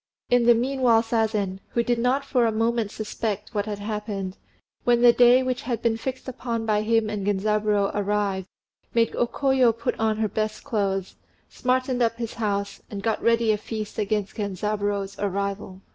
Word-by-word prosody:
In 245 -1 +4
the 240 - +7
meanwhile 245 -2 +3
Sazen, 220 -4 0 0.2
who 235 - +3
did 240 -1 0
not 260 +4 +1
for 250 -4 +2
a - - +1
moment 225 0 0
suspect 215 0 -4
what 205 0 -1
had 210 -1 -3
happened, 205 -2 -4 0.5
when 240 0 +3
the 240 -1 +8
day 245 +2 +6
which 255 -1 -2
had 235 -2 -3
been 230 -1 +2
fixed 255 +4 -5
upon 235 -3 -3
by 210 -1 +2
him 225 0 +2
and 210 -2 -3
Genzaburô 205 0 +1
arrived, 200 -2 -1 0.5
made 230 -1 +2
O 240 - +1
Koyo 265 -2 +3
put 230 +1 -2
on 220 -1 +1
her 220 0 +1
best 215 +1 -3
clothes, 195 -7 -2 0.3
smartened 255 0 0
up 230 -1 +2
his 230 -2 -4
house, 200 -2 -2
and 200 -1 -6
got 225 0 0
ready 230 -1 +3
a 210 - 0
feast 215 0 -5
against 205 -1 -1
Genzaburô's 205 0 -2
arrival. 200 -1 -3
220 Hz, 175 wpm, -25 LUFS, 205-235 Hz, 0.5 s, the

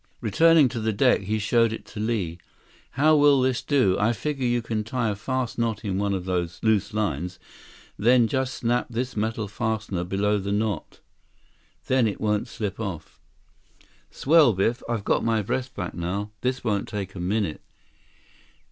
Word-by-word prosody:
Returning 155 +7 +5
to 115 - -4
the 110 0 0
deck, 100 - +3
he 105 +3 -1
showed 115 +2 +2
it 110 - -6
to 105 - -6
Li. 105 -7 -2 0.5
"How 155 +4 +4
will 145 -2 +5
this 130 -1 +1
do? 130 -11 +2
I 110 +3 +2
figure 135 +1 -2
you 120 -1 0
can 110 -1 -2
tie 115 +1 -1
a - - -3
fast 130 +3 -3
knot 115 -2 -1
in 95 -1 -1
one 100 -1 0
of 90 -1 -4
those 90 -2 -2
loose 110 -1 +2
lines, 90 -4 -2 0.6
then 120 +2 +5
just 130 +1 -1
snap 120 +1 0
this 125 +2 -3
metal 110 0 -2
fastener 110 -3 -2
below 100 +3 0
the 100 +1 -3
knot. 105 0 -2 0.8
Then 130 -3 +3
it 105 - -3
won't 105 +2 0
slip 105 -4 -5
off." 95 -8 -6 0.9
"Swell, 150 -4 +4
Biff. 105 +6 0
I've 115 -4 -1
got - - +1
my 115 -2 +1
breath 130 +6 -2
back - - -4
now. 95 +4 -3
This 130 +1 -1
won't 105 -4 -1
take 100 -2 -5
a 95 - -8
minute." 95 -2 -1
110 Hz, 175 wpm, -25 LUFS, 100-120 Hz, 0.9 s, Returning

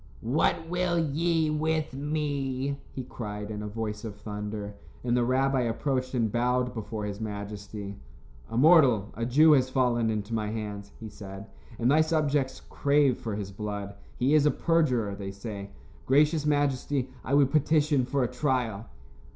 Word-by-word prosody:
"What 160 +5 +1
will 180 0 0
ye 160 0 +1
with 155 -1 0
me?" 140 -2 -2
he 130 - -5
cried, 105 -3 -6
in 105 -1 -4
a 105 - -4
voice 105 0 -4
of 110 -3 -6
thunder, 105 0 -5 0.3
and 120 -1 +1
the 125 - +3
rabbi 130 +2 +2
approached 130 +2 -1
and 115 -4 +1
bowed 125 +1 +1
before 110 -2 -4
his 100 +1 -5
majesty. 100 -1 -6 0.5
"A 115 - -3
mortal, 130 - +5
a 115 +1 -3
Jew, 155 +6 +6
has 130 -3 +4
fallen 125 -3 +2
into 105 0 -3
my 110 -2 -1
hands," 105 -2 -5
he 115 - -7
said, 100 -1 -9 0.3
"and 120 +2 +2
thy 155 +2 +5
subjects 150 -4 0
crave 140 -3 +2
for 110 -3 -4
his 100 -2 -5
blood. 100 0 -5 0.2
He 130 +4 +2
is 150 -1 +5
a - - +6
perjurer, 135 -12 +1
they 100 -1 -6
say. 100 0 -7 0.4
Gracious 150 +3 +3
majesty, 145 -2 +1 0.2
I 140 - +1
would 140 -2 +4
petition 150 -2 +3
for 135 0 +1
a - - +1
trial." 125 -5 -1
125 Hz, 165 wpm, -28 LUFS, 105-145 Hz, 0.5 s, Jew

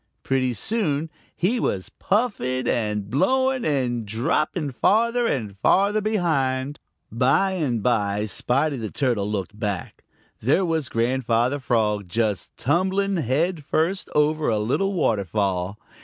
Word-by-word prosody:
Pretty 130 -2 +1
soon 160 - -1 0.2
he 215 +8 +1
was 95 - -2
puffing 185 - -1
and 105 -3 -1
blowing 260 - +1
and 125 -5 0
dropping 140 - -1
farther 235 - +2
and 110 - -2
farther 200 - +3
behind. 145 -10 0 0.3
By 135 - +2
and 135 - -1
by, 105 -4 +1
Spotty 135 +8 0
the 110 -3 -4
Turtle 115 -7 0
looked 105 0 -4
back. 100 -5 -4 0.4
There 145 - +2
was 160 -5 -1
Grandfather 120 +2 +1
Frog 105 -6 0
just 110 -1 -2
tumbling 190 +6 +1
head 155 +4 0
first 165 +7 0
over 150 +1 +2
a 110 - +1
little 135 - 0
waterfall. 100 - 0
130 Hz, 125 wpm, -23 LUFS, 110-175 Hz, 0.4 s, farther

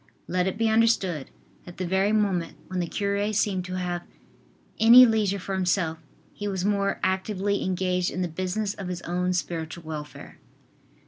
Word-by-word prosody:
Let 180 +1 0
it 190 - -2
be 225 0 +2
understood 220 -9 +2 0.4
that 175 - -11
the 185 - -2
very 190 +3 +1
moment 195 -6 0
when 185 -1 -2
the 175 - -1
cure 200 +2 -1
seemed 195 -3 0
to 185 0 -5
have 175 -1 -2 0.8
any 235 +3 +9
leisure 215 -4 +1
for 195 +1 -5
himself, 180 -3 0 0.3
he 205 - -5
was 190 -2 -2
more 200 -1 0
actively 195 +1 0
engaged 180 -1 0
in 185 - -3
the - - -1
business 185 +5 -2
of 195 -3 -7
his 180 -1 -5
own 180 +1 -1
spiritual 170 -1 -4
welfare. 155 -2 -8
185 Hz, 170 wpm, -26 LUFS, 180-205 Hz, 0.8 s, any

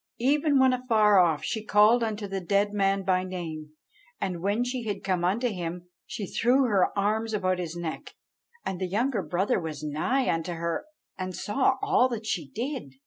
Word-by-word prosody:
Even 285 +3 +2
when 260 -1 +5
afar 220 -5 +4
off 165 -4 +3
she 220 -3 -3
called 215 +3 +5
unto 215 -2 -3
the 195 0 -4
dead 200 +3 +1
man 195 -1 +1
by 185 -1 +1
name, 160 -5 -6 0.5
and 180 -3 -3
when 205 +5 +1
she 250 0 -3
had 205 -2 -4
come 185 -2 0
unto 210 +8 +1
him 175 -2 -5 0.2
she 200 +1 -5
threw 250 +7 +2
her 205 -7 +3
arms 215 +2 0
about 185 -3 0
his 170 -2 -4
neck; 170 -2 -6 0.5
and 190 -1 -4
the 185 - 0
younger 225 +4 0
brother 180 +5 0
was 155 -3 -6
nigh 155 - 0
unto 165 +1 -1
her, 170 - -3 0.3
and 185 -1 -4
saw 260 +4 +1
all 255 - +3
that 225 -3 -5
she 165 -9 -2
did. 235 - -5
200 Hz, 185 wpm, -27 LUFS, 175-230 Hz, 0.5 s, when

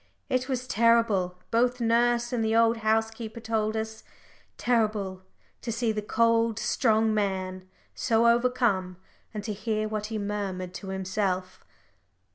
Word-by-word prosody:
It 255 0 0
was 255 -1 -2
terrible, 225 -6 +2
both 245 +2 +2
nurse 240 +1 +2
and 235 -2 0
the 220 0 +1
old 230 0 +4
housekeeper 220 +1 -1
told 220 -1 -1
us 220 0 -5 0.5
terrible 210 -6 0 0.4
to 235 - -3
see 230 0 0
the 215 -1 -2
cold, 230 +1 +2
strong 220 -3 +2
man 185 -3 -2 0.2
so 230 -1 +2
overcome, 235 -6 +2 0.3
and 210 -2 -5
to 215 0 -3
hear 215 +1 -2
what 215 -1 -3
he 220 0 -4
murmured 200 -3 -3
to 195 - -8
himself. 190 -1 -2
220 Hz, 135 wpm, -27 LUFS, 200-230 Hz, 0.5 s, old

